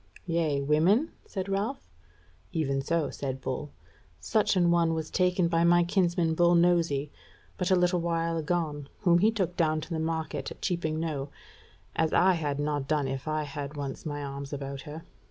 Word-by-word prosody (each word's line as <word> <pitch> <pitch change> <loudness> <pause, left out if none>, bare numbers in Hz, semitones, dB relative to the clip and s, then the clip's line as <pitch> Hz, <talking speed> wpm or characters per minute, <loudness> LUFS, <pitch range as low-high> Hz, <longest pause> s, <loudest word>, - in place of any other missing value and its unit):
"Yea, 165 -4 +1
women?" 170 - +3 0.2
said 190 -1 -4
Ralph. 200 +7 -2 0.6
"Even 140 -4 0
so," 160 0 0
said 135 -2 -4
Bull, 130 +3 -4 0.5
"such 215 -2 +1
an 175 -2 +4
one 170 -1 +3
was 160 -1 -4
taken 180 -1 +2
by 165 0 +2
my 175 0 +5
kinsman 175 -2 +1
Bull 175 +1 +4
Nosy 170 -5 +2 0.4
but 180 - -1
a 190 - +5
little 180 0 +2
while 165 0 0
agone, 160 -3 -2
whom 175 -4 +4
he 210 +4 +5
took 190 -6 -1
down 155 -2 +2
to - - -9
the 160 - -1
market 160 -3 -2
at - - -10
Cheaping 160 -4 -1
Knowe, 150 -4 -3 0.7
as 160 -1 +1
I 185 +1 +5
had 145 -4 -2
not 145 -2 -1
done 150 -2 +1
if 135 +2 -4
I 155 0 0
had 145 0 -6
once 140 -2 -5
my 145 -2 -4
arms 140 0 -6
about 140 -1 -5
her. 160 +2 -7
160 Hz, 180 wpm, -28 LUFS, 145-175 Hz, 0.7 s, my